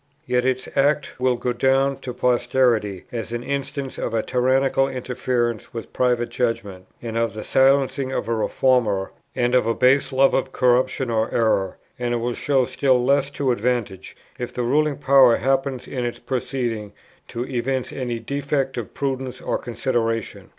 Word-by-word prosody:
Yet 125 Hz, -2 st, +1 dB
its 130 Hz, 0 st, 0 dB
act 145 Hz, 0 st, +1 dB
will 125 Hz, -1 st, +2 dB
go 125 Hz, +1 st, -2 dB
down 135 Hz, +2 st, +2 dB
to 125 Hz, -, -6 dB
posterity 120 Hz, -5 st, +1 dB
as 115 Hz, -2 st, -5 dB
an 120 Hz, 0 st, -3 dB
instance 140 Hz, 0 st, -4 dB
of 115 Hz, -, -2 dB
a 110 Hz, -, +1 dB
tyrannical 135 Hz, +2 st, +2 dB
interference 125 Hz, -3 st, -2 dB
with 115 Hz, -, -7 dB
private 120 Hz, -1 st, +1 dB
judgment, 115 Hz, -6 st, -3 dB, 0.2 s
and 115 Hz, -1 st, -5 dB
of 115 Hz, -1 st, 0 dB
the 110 Hz, -, -5 dB
silencing 135 Hz, 0 st, +2 dB
of 115 Hz, -, -2 dB
a 115 Hz, -, 0 dB
reformer, 110 Hz, -4 st, +1 dB, 0.2 s
and 120 Hz, 0 st, +1 dB
of 125 Hz, -3 st, +3 dB
a 115 Hz, -, +1 dB
base 130 Hz, +3 st, +3 dB
love 135 Hz, +1 st, +4 dB
of 135 Hz, 0 st, 0 dB
corruption 125 Hz, 0 st, +1 dB
or 110 Hz, -1 st, 0 dB
error; 100 Hz, -5 st, +1 dB, 0.2 s
and 120 Hz, -1 st, -1 dB
it -, -, +1 dB
will 120 Hz, +1 st, -2 dB
show 135 Hz, 0 st, +1 dB
still 130 Hz, -1 st, +1 dB
less 140 Hz, +1 st, +2 dB
to 140 Hz, -2 st, -1 dB
advantage, 115 Hz, -5 st, -2 dB, 0.2 s
if 125 Hz, -, -4 dB
the 125 Hz, -, -3 dB
ruling 145 Hz, +4 st, +1 dB
power 135 Hz, -4 st, +6 dB
happens 135 Hz, 0 st, -1 dB
in 125 Hz, -2 st, -3 dB
its 120 Hz, 0 st, -3 dB
proceedings 120 Hz, -5 st, -3 dB, 0.3 s
to 120 Hz, +1 st, -4 dB
evince 130 Hz, 0 st, -2 dB
any 125 Hz, -3 st, -3 dB
defect 140 Hz, +2 st, -2 dB
of 120 Hz, -, -6 dB
prudence 130 Hz, -2 st, -3 dB
or -, -, -2 dB
consideration. 115 Hz, -2 st, -2 dB
125 Hz, 170 wpm, -22 LUFS, 115-135 Hz, 0.3 s, power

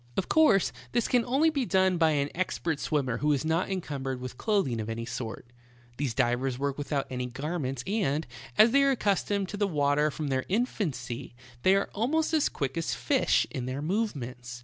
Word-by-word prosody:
Of 190 Hz, -, 0 dB
course, 265 Hz, -, +4 dB, 0.2 s
this 240 Hz, -1 st, +2 dB
can 245 Hz, -2 st, +3 dB
only 280 Hz, +6 st, +3 dB
be 280 Hz, -4 st, 0 dB
done 190 Hz, -5 st, +2 dB
by 160 Hz, -1 st, +5 dB
an 140 Hz, -1 st, 0 dB
expert 170 Hz, -4 st, -2 dB
swimmer 135 Hz, -8 st, 0 dB
who 150 Hz, 0 st, +1 dB
is 140 Hz, +1 st, -1 dB
not 165 Hz, +3 st, +1 dB
encumbered 140 Hz, -8 st, -3 dB
with 125 Hz, -1 st, -6 dB
clothing 165 Hz, -, 0 dB
of 110 Hz, -, -5 dB
any 115 Hz, +1 st, -3 dB
sort. 120 Hz, -1 st, -5 dB, 0.5 s
These 130 Hz, -5 st, -2 dB
divers 125 Hz, +2 st, +1 dB
work 140 Hz, 0 st, -1 dB
without 145 Hz, -1 st, -1 dB
any 125 Hz, -1 st, -2 dB
garments, 135 Hz, 0 st, -3 dB
and, 180 Hz, -7 st, 0 dB, 0.3 s
as 220 Hz, +2 st, +7 dB
they 280 Hz, +2 st, +5 dB
are 275 Hz, -, +4 dB
accustomed 200 Hz, -5 st, +1 dB
to 205 Hz, -, -5 dB
the 205 Hz, 0 st, +1 dB
water 150 Hz, -2 st, +2 dB
from 150 Hz, 0 st, -4 dB
their 130 Hz, -1 st, 0 dB
infancy, 170 Hz, -, -2 dB, 0.2 s
^ -, -, -29 dB
they 190 Hz, +6 st, +5 dB
are 195 Hz, -, 0 dB
almost 310 Hz, +10 st, 0 dB
as 310 Hz, -2 st, +3 dB
quick 135 Hz, +3 st, -3 dB
as 165 Hz, -, -2 dB
fish -, -, +2 dB
in 125 Hz, -1 st, -4 dB
their 135 Hz, +3 st, -3 dB
movements, 130 Hz, -, -3 dB
i -, -, -12 dB
150 Hz, 200 wpm, -28 LUFS, 130-200 Hz, 0.5 s, as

